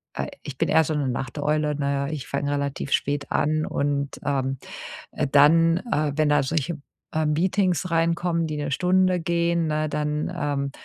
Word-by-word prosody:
äh, - - -2
äh - - -7
ich 140 -3 -7
bin - - +1
eher 160 - +5
so 155 - -2
'ne 145 -2 0
Nachteule, 150 +4 -1
ne, 140 -1 -1
ich 145 -4 -5
fang 140 +1 -2
relativ 140 -1 -2
spät 145 0 0
an. 155 +1 +1
Und, 140 -1 -2
ähm, 135 -1 0 0.5
äh, - - -1
dann, 165 +4 +5
äh, 150 -1 +1
wenn 155 -1 +2
da 150 0 +4
solche, 155 +2 -2 0.3
äh, 155 0 +1
Meetings 180 +3 +1
reinkommen, 170 0 +1
die 155 - -4
'ne 145 -1 -3
Stunde 185 +3 +2
gehen, 170 0 +1
ne, 155 0 0
dann 150 +2 -2
ähm, 140 -4 -2
150 Hz, 175 wpm, -24 LUFS, 140-165 Hz, 0.5 s, eher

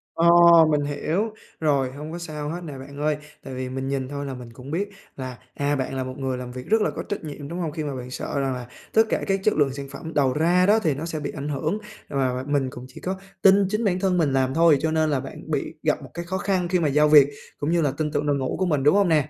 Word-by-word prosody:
Ờ, 165 +1 +3 0.4
mình 150 -1 +2
hiểu, 160 +9 -1 0.3
rồi 140 -5 +1
hông 150 +3 -7
có 170 - -5
sao 150 -3 -5
hết 170 +3 -4
nè 145 -5 -7
bạn 140 +2 -10
ơi, 150 0 +1 0.3
tại 130 - -7
vì 130 0 -4
mình 130 +1 -4
nhìn 135 -1 -2
thôi 145 0 -4
là 135 - -4
mình 120 -2 -9
cũng 130 +3 -10
biết 200 +5 -1 0.3
là, 130 -2 -6 0.2
à, 145 +1 0
bạn 130 -1 -2
là 130 - -1
một 130 - -5
người 130 -2 -2
làm 125 -1 -6
việc 125 0 -8
rất 220 0 +3
là - - +2
có - - -4
trách 205 - -3
nhiệm, 145 -2 -7
đúng 170 +4 -5
hông? 165 -3 -2
Khi 155 +1 -4
mà 145 -3 -3
bạn 125 0 -7
sợ 140 - -3
rằng 135 -1 0
là 125 -1 -6 0.3
tất 220 - +6
cả - - 0
các 195 0 +1
chất 215 - +3
lượng 140 -3 +2
sản 140 0 -6
phẩm 160 +4 -7
đầu 135 -3 +2
ra 175 +5 +3
đó 215 +2 +5
thì 160 -8 +1
nó 145 +4 -5
sẽ 165 -2 -3
bị 145 -1 -4
ảnh 145 0 -5
hưởng 155 +7 -1 0.3
và 130 -2 0
và 130 +1 -3
mình 140 -2 +1
cũng 125 0 -9
chỉ 130 - -13
có 185 +1 -2 0.3
tin 195 0 +6
chính 215 +3 0
bản 185 -2 +1
thân 185 -2 +1
mình 150 -5 +2
làm 130 -1 +2
thôi, 165 -1 +5
cho 160 - +1
nên 155 -1 +2
là 140 - +1
bạn - - -9
bị - - -2
gặp - - +1
một - - -10
cái 170 0 -5
khó 190 +2 -2
khăn 185 -3 0
khi 180 0 +1
mà 160 - +2
giao 150 +2 +4
việc 145 -2 +8 0.3
cũng 145 +3 -1
như 170 -1 +3
là 145 - +2
tin 155 -1 -1
tưởng 145 - -1
đội 145 -1 +2
ngũ 130 -2 -2
của 185 - +2
mình, 150 -6 +1
đúng 150 +7 +5
hông 200 -2 +4
nè? 150 -2 +2
150 Hz, 300 wpm, -24 LUFS, 135-170 Hz, 0.4 s, việc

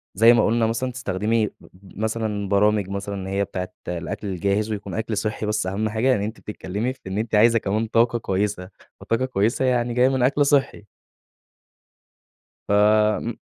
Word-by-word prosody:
زي 115 +4 +7
ما 120 - +3
قُلنا 115 0 +2
مثلًا 120 +3 -2
تستخدمي 110 -2 -1
بب 95 +1 -18
مثلًا 110 -2 -2
برامج 105 -1 +2
مثلًا، 100 +1 -4
إن 95 -1 -5
هي 100 +1 0
بتاعة 90 -2 -5
الأكل 90 +4 -4
الجاهز، 100 +3 -1
ويكون 100 -3 -5
أكل 110 -1 -3
صحّي، 110 +1 -2
بس 105 -2 -1
أهم 105 +3 -1
حاجة، 120 +4 +2
إن 100 - -2
أنتِ 110 +3 -4
بتتكلّمي 105 +4 -4
في - - -26
إن 95 +1 -4
أنتِ 110 0 -1
عايزة 115 +2 +5
كمان 105 +2 -1
طاقة 115 +1 +2
كويسة. 95 -2 -2 0.3
فالطاقة 115 +3 -1
الكويسة 120 +1 0
يعني 120 -1 +1
جاية 125 +2 +4
من 130 -2 0
أكل 145 +3 +3
صحّي. 140 -7 +1 1.8
فم 105 +2 +3
105 Hz, 170 wpm, -23 LUFS, 100-115 Hz, 1.8 s, زي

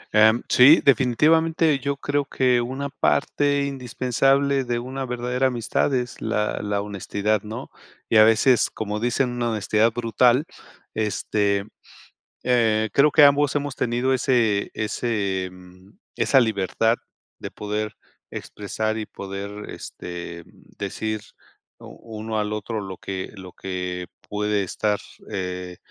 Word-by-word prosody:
Em, 110 +2 +5
sí, 140 +6 +7
definitivamente, 155 +4 +3
yo 140 +1 -2
creo 145 0 -1
que 125 -3 +2
una 135 +4 -4
parte 145 0 +1
indispensable 135 +1 +1
de 120 -1 -1
una 130 +2 -4
verdadera 125 +1 0
amistad 120 +2 0
es 125 -1 -3
la 110 -1 -1
la 100 -1 -1
honestidad, 105 +1 -1
¿no? 110 +2 -7 0.4
Y 115 - +4
a 110 - +9
veces, 115 +3 +4
como 105 -1 -4
dicen, 120 +2 0
una 120 -1 -1
honestidad 110 +1 +2
brutal, 120 +4 +2 0.5
este, 105 -1 0 0.8
eh, 110 -3 +2
creo 145 +2 +5
que 150 - +6
ambos 140 0 +4
hemos 145 -2 -2
tenido 120 +2 0
ese 120 -6 +1
ese, 105 -4 -2
mm, 90 +1 -16 0.2
esa 135 - +4
libertad 110 0 +1 0.4
de - - -7
poder 105 +1 -4 0.4
expresar 110 +2 -3
y 110 - -3
poder, 100 +1 -7
este, 85 -1 -8
mm, - - -21 0.3
decir 110 +2 -3 0.6
u - - -12 0.3
uno 110 0 -2
al 105 0 -1
otro 105 +1 -3
lo 95 -2 -7
que 95 -1 -5
lo 95 -2 -10
que 90 -1 -4 0.2
puede 105 0 0
estar, 105 +2 -1 0.3
eh, 90 -1 -4
110 Hz, 130 wpm, -23 LUFS, 105-130 Hz, 0.8 s, a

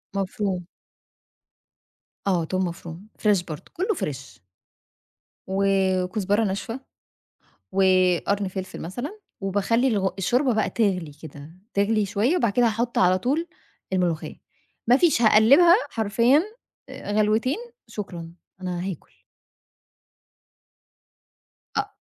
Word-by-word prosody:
مفروم. 190 -2 -2 1.6
آه 175 -4 +2
توم 185 +3 -1
مفروم، 170 -1 -7 0.2
فريش 205 -4 +3
برضه، 155 -4 -9
كله 390 +5 0
فريش. 135 - -6 1.0
و 190 +1 0 0.4
وكزبرة 205 +3 0
ناشفه، 220 +5 -3 0.9
وقرن 190 +1 +2
فلفل 190 0 -6
مثلًا، 245 - -6 0.2
وباخلي 205 +6 +1
الغ 200 -5 +1
الشوربة 245 +8 +2
بقى 215 -1 +1
تغلي 185 -9 0
كده 150 -1 -10 0.2
تغلي 205 +1 +2
شوية، 220 - +1
وبعد 235 - +1
كده 245 -1 +3
هاحُط 230 +2 -1
علي 185 0 +4
طول 290 - 0 0.5
الملوخية، 175 -4 -1 0.5
مافيش 265 +2 +4
هاقلّبها 260 +11 +7
حرفيًا 230 - +3 0.5
آآ - - -7
غلوتين، 215 - +2 0.3
شكرًا 175 -5 -7 0.3
أنا 180 -1 -3
هاكل. 175 - -11 2.5
أ - - -2
200 Hz, 100 wpm, -24 LUFS, 185-230 Hz, 2.5 s, هاقلّبها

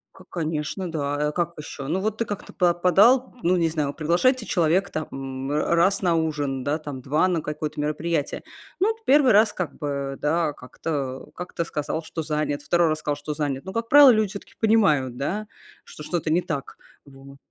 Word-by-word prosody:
Ка 190 - -14
конечно, 165 +2 -3
да. 145 -2 -1
А 150 - -1
как 170 0 -1
еще? 140 -2 -7
Ну 180 +5 0
вот 215 +2 -2
ты 230 - 0
как-то 205 -3 -7
па 175 -1 +3
подал, 205 +10 +4
ну, 180 +2 +3
не 165 -1 +2
знаю, 150 -3 -2
приглашаете 200 - +1
человека 180 +2 +1
там, 155 0 -4
м, 135 0 -5
р 150 +3 +1
раз 190 +4 +3
на 175 -3 +2
ужин, 145 -5 -1
да, 145 +3 0
там, 145 -4 -7
2 150 +7 +2
на 175 -3 0
какое-то 150 0 -4
мероприятие. 150 0 -2 0.4
Ну, 390 - +3
вот 450 - -24
1 270 -3 +5
раз 210 +1 +5
как 180 -5 -5
бы, 140 -2 -3
да, 155 0 +1
как-то 135 0 -5
как-то 180 -1 -4
сказал, 155 0 -3
что 160 0 -5
занят, 150 -1 -2
2 170 +2 +2
раз 155 0 0
сказал, 150 -1 -2
что 145 +1 -5
занят. 145 -3 -3
Но, 190 - -6
как 230 0 -3
правило, 290 -1 +9
люди 215 -2 +2
всё-таки 200 0 -9
понимают, 155 - +2
да, 205 +11 -3 0.4
что - - -12
что-то 165 +1 -2
не 175 - +3
так, 145 -5 -5 0.3
вот. 140 0 -14
160 Hz, 200 wpm, -24 LUFS, 145-185 Hz, 0.4 s, правило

